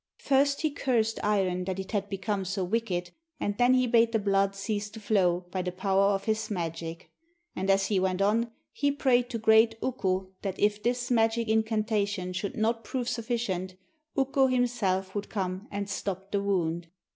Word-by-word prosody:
First 280 +1 +2
he 310 - +1
cursed 235 -6 0
Iron 190 -3 +1
that 190 0 -3
it 190 - -6
had 205 -2 -1
become 195 0 -2
so 190 +1 -2
wicked, 180 -3 -1 0.3
and 205 - -1
then 245 +1 +5
he 255 0 +3
bade 230 -1 +3
the - - +4
blood 195 -1 +1
cease 205 +1 -3
to 220 - -10
flow 185 -5 +2
by 185 - -1
the 180 0 -3
power 195 +2 +2
of 195 0 -2
his 220 0 -1
magic. 165 -2 -5 0.4
And 190 +1 -2
as 195 0 +4
he 195 -1 +1
went 185 0 0
on 220 +4 +2 0.2
he 285 -1 +1
prayed 250 -3 +2
to 235 - -3
great 220 0 +5
Ukko 190 -7 -1
that 195 -2 -4
if 210 0 +2
this 245 +2 -1
magic 225 0 +2
incantation 215 -4 0
should 200 +8 -4
not 225 +1 0
prove 250 0 -3
sufficient, 220 -7 -2 0.4
Ukko 270 0 +3
himself 215 -7 0
would 205 0 -4
come 190 0 -3
and 200 0 -3
stop 195 -1 -4
the 200 - +1
wound. 175 -4 -1
205 Hz, 180 wpm, -28 LUFS, 190-230 Hz, 0.4 s, then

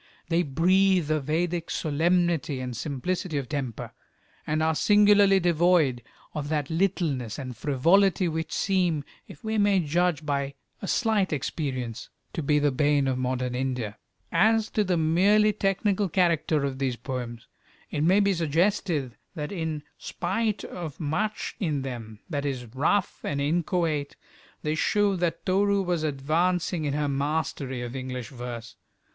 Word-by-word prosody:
They 170 +1 +3
breathe 180 +2 +3
a 155 - +2
Vedic 165 +4 -1
solemnity 165 -2 +1
and 125 -1 -4
simplicity 155 - -2
of 135 -3 -3
temper, 135 -6 -4 0.5
and 155 +1 +1
are 160 0 +2
singularly 205 +1 +5
devoid 170 -7 +3 0.3
of 145 -2 -4
that 150 -1 -1
littleness 160 - 0
and 130 -3 -6
frivolity 175 - +3
which 160 0 -3
seem, 180 -6 +1 0.2
if 145 - -13
we 220 0 -1
may 205 -2 +4
judge 170 -1 0
by 140 -1 -1 0.3
a 195 - -4
slight 220 -4 +1
experience, 130 -5 -3 0.2
to - - -2
be 150 0 +2
the 145 -1 +2
bane 145 0 +2
of 130 -1 0
modern 125 -1 -1
India. 125 -5 -3 0.3
As 220 +5 +3
to 215 - +2
the 180 -3 +1
merely 200 +7 +4
technical 195 0 0
character 165 -4 +2
of 135 -1 -4
these 130 -3 0
poems, 120 -2 -6 0.5
it 145 - -1
may 185 +5 +5
be 200 -1 +3
suggested 165 - 0 0.2
that 150 -3 -4
in 160 -5 -3 0.2
spite 205 +4 -2
of 165 -5 -7
much 175 +8 -2
in 150 -8 -1
them 115 -5 -7
that 145 -5 -2
is 130 -4 -3
rough 165 +9 0
and 140 - -2
inchoate, 160 -1 0 0.5
they 150 - 0
show 205 +5 +2
that 170 -1 -2
Toru 200 +1 +2
was 175 -3 0
advancing 160 +4 0
in 145 -1 -1
her 150 0 0
mastery 140 -2 -2
of 120 +1 -6
English 130 -3 -5
verse. 120 -2 -7
155 Hz, 150 wpm, -26 LUFS, 140-185 Hz, 0.5 s, singularly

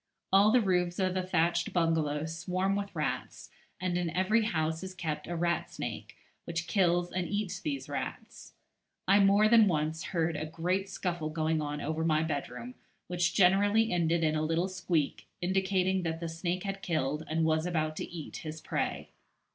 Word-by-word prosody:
All 200 +2 +7
the 250 +1 +5
roofs 180 -3 +1
of 185 -1 +1
the 185 - 0
thatched 170 -1 +1
bungalows 160 -2 0
swarm 185 +3 0
with 200 -2 -4
rats, 150 -5 -3 0.3
and 180 -1 0
in 175 -1 -1
every 210 +6 +2
house 160 -5 -1
is 190 0 -7
kept 160 -5 -4
a 175 - -3
rat 170 0 0
snake, - - -6 0.3
which 170 0 -3
kills 175 -1 +2
and 180 -2 -2
eats 205 -2 -2
these 140 -3 -4
rats. - - -6 0.5
I 200 +2 +6
more 200 +2 +5
than 225 -1 +6
once 155 -1 -1
heard 165 -2 0
a 155 +1 -3
great 180 +5 -1
scuffle 170 -4 -3
going 155 0 0
on 150 0 -3
over 160 +2 -2
my 155 -1 +2
bedroom, 125 -6 -4 0.3
which 175 0 0
generally 205 +3 +4
ended 170 -1 +2
in 155 -1 +2
a 155 - 0
little 165 +3 +1
squeak, 175 -5 -1
indicating 190 0 +1
that 165 -2 -2
the 170 - -3
snake 175 +2 -2
had 195 -1 -4
killed, 155 -4 -1
and 160 +1 +1
was 160 +1 +1
about 155 -3 -1
to - - -4
eat, 165 -3 -7
his 155 0 -6
prey. - - -3
170 Hz, 180 wpm, -30 LUFS, 160-185 Hz, 0.5 s, All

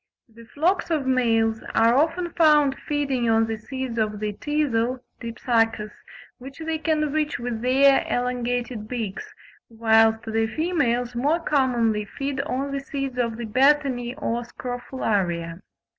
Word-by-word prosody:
The 230 0 -16
flocks 335 - 0
of 310 -5 0
males 225 -4 +2
are 230 +1 +5
often 335 +4 +1
found 300 -5 +4
feeding 275 -5 0
on 225 0 +4
the 225 0 -3
seeds 260 0 -5
of 210 -1 -1
the 210 0 -2
teazle 255 -3 -1 0.2
(Dipsacus), 225 -2 0 0.5
which 270 +2 -10
they 320 -1 -3
can 305 -1 0
reach 305 0 -1
with 240 -2 -4
their 270 +2 +4
elongated 245 -2 -2
beaks, 220 -5 -5 0.4
whilst 225 -1 +3
the 225 0 0
females 245 -4 0
more 285 +8 +1
commonly 240 -9 +1
feed 275 -1 -2
on 280 0 -3
the 275 - -2
seeds 275 -2 -4
of 230 -2 -1
the 235 - -4
betony 255 0 +2
or 240 -5 -2
Scrophularia. 205 -9 -3
245 Hz, 140 wpm, -24 LUFS, 225-280 Hz, 0.5 s, are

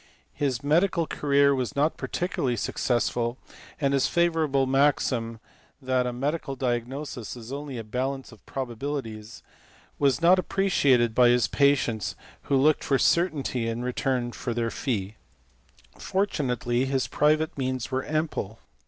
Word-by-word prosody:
His 135 -3 -1
medical 170 +3 +2
career 140 -2 +3
was 130 +1 -2
not 150 +3 +2
particularly 140 -8 -2
suc - - -4
cessful, 120 0 0 0.4
and 140 -2 +1
his 135 - +3
favourite 160 -6 +1
maxim 130 -4 +1 0.4
that 130 -2 0
a - - -1
medical 140 +3 -2
diagnosis 125 0 -3
is 120 +1 -9
only 140 -2 -5
a 115 - -5
balance 130 +5 -3
of 110 - -17
probabilities 120 -4 -5 0.6
was 140 -2 +3
not 175 +3 +5
appreciated 140 - +2
by 120 +1 +5
his 120 -2 +4
patients 135 - +1 0.3
who 140 - +4
looked 150 +3 +3
for 135 - +2
certainty 145 -8 +1
in 115 +1 -3
return 125 -1 -1
for 120 -1 -4
their 115 -1 -1
fee. 105 -5 -3 0.8
Fortunately 130 - 0
his 135 -1 0
private 155 +2 +2
means 130 -2 -3
were 130 0 -1
ample. 150 -9 -2
135 Hz, 135 wpm, -26 LUFS, 120-145 Hz, 0.8 s, not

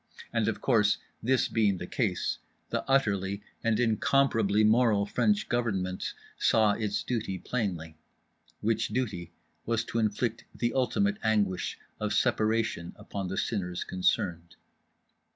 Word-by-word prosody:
And 115 -2 +1
of 115 - -1
course, 105 -5 +3 0.2
this 130 +1 +2
being 105 -4 +2
the - - -5
case, - - -1 0.3
the - - 0
utterly 100 -7 +1 0.2
and 115 -1 +2
incomparably 115 -2 +3
moral 110 -2 +4
French 210 - +1
Government 95 -7 -1 0.2
saw 110 -2 +4
its 105 -1 -1
duty 110 -6 -2
plainly; 85 -9 -3 0.6
which 115 +1 +1
duty 105 -7 -3 0.3
was 115 0 0
to 115 - -2
inflict 110 +1 -1
the 120 0 -1
ultimate 200 +11 +1
anguish 105 -5 0 0.2
of 105 0 -1
separation 110 -7 +1
upon 100 -2 -5
the 95 +1 -4
sinners 95 -5 -2
concerned. 85 -2 -1
110 Hz, 125 wpm, -29 LUFS, 100-115 Hz, 0.6 s, moral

